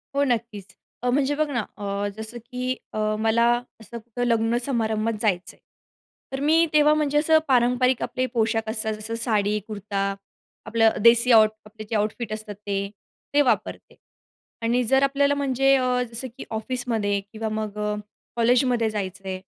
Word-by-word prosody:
हो, 280 - +3
नक्कीच. 230 -6 -3 0.3
अ, 250 - 0
म्हणजे 280 +2 +1
बघ 310 +1 +1
ना 240 -7 -1
अ, 200 0 -2
जसं 220 +2 -7
की 255 +1 -3 0.2
अ, - - -3 0.2
मला 225 +1 +3 0.4
असं 235 +2 -9
कुठं 240 +2 -5
लग्न 230 0 +2
समारंभात 225 -3 0
जायचं 185 -5 -1
आहे, - - -31 0.7
तर 270 - -3
मी 325 +2 +5
तेव्हा 300 0 +5
म्हणजे 295 -1 +1
असं 315 +1 +5
पारंपरिक 250 0 +3
आपले 255 0 -1
पोशाख 225 -1 0
असतात 220 0 -1
जसं 215 +2 -5
साडी, 210 -3 0
कुर्ता, 200 -2 -3 0.5
आपलं 225 -1 +3
देसी 235 +1 +6
आउट 220 -2 +7 0.2
कपड्याचे 215 +1 -7
आउटफिट 215 +1 -1
असतात 215 -1 -6
ते, 200 -1 -3 0.4
ते 290 - +5
वापरते. 260 - -1 0.7
आणि 235 +2 +1
जर 265 +4 +3
आपल्याला 280 +1 +2
म्हणजे 270 -1 +3
अ, 250 -1 +1
जसं 235 +3 -4
की - - -6
ऑफिसमध्ये 220 -3 -1
किंवा 220 0 -4
मग 215 -1 -4
अ, 210 0 -1 0.4
कॉलेजमध्ये 240 -1 +2
जायचं 195 -2 -5
आहे, 185 0 -3
230 Hz, 160 wpm, -24 LUFS, 215-255 Hz, 0.7 s, आउट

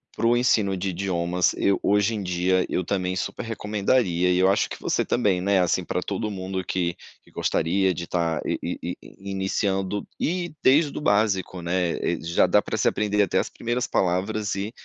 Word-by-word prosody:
para 115 - +1
o 120 +1 +4
ensino 105 -6 +2
de 95 +2 -2
idiomas, 90 -1 0
eu, 100 - +2
hoje 105 +2 +2
em 105 - -3
dia, 90 0 +1
eu 90 - 0
também 90 -1 -1
super 95 - -3
recomendaria, 105 -4 0
e 90 - +3
eu 95 - +4
acho 100 +1 +2
que - - -7
você - - 0
também, 100 -7 +1
né, 100 +1 +2
assim, 90 -2 +1
pra - - -2
todo 105 - -3
mundo 95 -1 -4
que 85 -1 -1 0.3
que - - -22
gostaria 95 +3 +1
de 85 - -4
estar 85 -2 -1
i - - -1
i - - -4
i - - -15 0.2
iniciando, 95 0 -1
e 175 0 -1
desde 145 +3 +4
o - - -4
básico, 100 -6 +1
né, 85 0 0
eh, 85 - -1
já 85 +1 +2
dá - - +4
para - - -4
se - - +1
aprender 105 -1 +2
até 95 - +1
as - - -2
primeiras 120 +1 -2
palavras 95 +3 0
e 100 +2 -3
95 Hz, 200 wpm, -24 LUFS, 90-105 Hz, 0.3 s, o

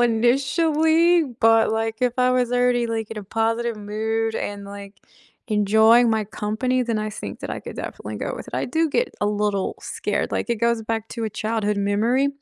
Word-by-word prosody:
initially, 310 +8 +3
but, 225 -3 +3
like, 225 0 -1
if 250 -1 +2
I 250 0 +4
was 250 -1 +1
already, 245 -1 +2
like, 225 -2 -3
in 225 - -5
a 205 - -7
positive 225 +2 -1
mood 220 +2 -2
and, 205 0 -4
like, 200 0 -9 0.5
enjoying 220 +3 +5
my 220 -1 +1
company, 220 +5 -1
then 230 -2 -1
I 215 0 -3
think 210 - -7
that - - -6
I - - -3
could - - -9
definitely - - -6
go - - -3
with - - -8
it, - - -7
I - - -1
do 325 0 0
get 475 - 0
a 205 - +1
little 205 -1 -1
scared, - - -2
like, - - -2
it 235 - +1
goes 235 -1 +1
back 225 0 -3
to 230 -1 -4
a 220 - -2
childhood 215 -1 -1
memory, 220 +7 +1
225 Hz, 200 wpm, -23 LUFS, 215-245 Hz, 0.5 s, enjoying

